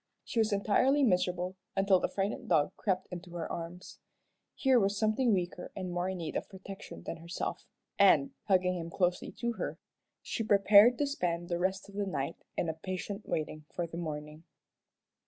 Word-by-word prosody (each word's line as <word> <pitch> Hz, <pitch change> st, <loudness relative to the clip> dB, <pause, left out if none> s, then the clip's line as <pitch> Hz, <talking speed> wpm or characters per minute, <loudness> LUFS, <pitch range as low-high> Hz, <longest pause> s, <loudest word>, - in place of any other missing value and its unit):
She 235 Hz, -, -2 dB
was 220 Hz, 0 st, +3 dB
entirely 240 Hz, +8 st, +3 dB
miserable 180 Hz, -3 st, +1 dB, 0.2 s
until 195 Hz, -1 st, +4 dB
the -, -, -1 dB
frightened 205 Hz, +4 st, -2 dB
dog 150 Hz, +4 st, +3 dB
crept 190 Hz, -2 st, -1 dB
into 175 Hz, 0 st, -8 dB
her 165 Hz, -2 st, -3 dB
arms. 170 Hz, +2 st, -7 dB, 0.6 s
Here 265 Hz, -3 st, +4 dB
was 200 Hz, -1 st, +1 dB
something 220 Hz, +3 st, +2 dB
weaker 180 Hz, -2 st, -1 dB
and 185 Hz, -2 st, -4 dB
more 175 Hz, +1 st, -1 dB
in 190 Hz, -, -3 dB
need 165 Hz, -3 st, -5 dB
of -, -, -3 dB
protection 195 Hz, 0 st, -9 dB
than 165 Hz, -, -5 dB
herself, 170 Hz, +2 st, -5 dB, 0.3 s
and, 275 Hz, 0 st, +6 dB
hugging 185 Hz, -2 st, +2 dB
him 165 Hz, 0 st, -5 dB
closely 180 Hz, 0 st, 0 dB
to 235 Hz, 0 st, -2 dB
her, -, -, -4 dB, 0.5 s
she 225 Hz, -, -2 dB
prepared 210 Hz, +3 st, +7 dB
to 290 Hz, -, +2 dB
spend 175 Hz, -11 st, -2 dB
the 175 Hz, -1 st, 0 dB
rest 190 Hz, +2 st, -1 dB
of 200 Hz, -, -14 dB
the 200 Hz, 0 st, -2 dB
night 160 Hz, -3 st, -2 dB, 0.2 s
in -, -, 0 dB
a 160 Hz, -, -1 dB
patient 185 Hz, +5 st, -5 dB
waiting 155 Hz, -1 st, -3 dB
for 175 Hz, -, -1 dB
the 165 Hz, -, -9 dB
morning. 150 Hz, -1 st, -5 dB
185 Hz, 180 wpm, -31 LUFS, 175-205 Hz, 0.6 s, prepared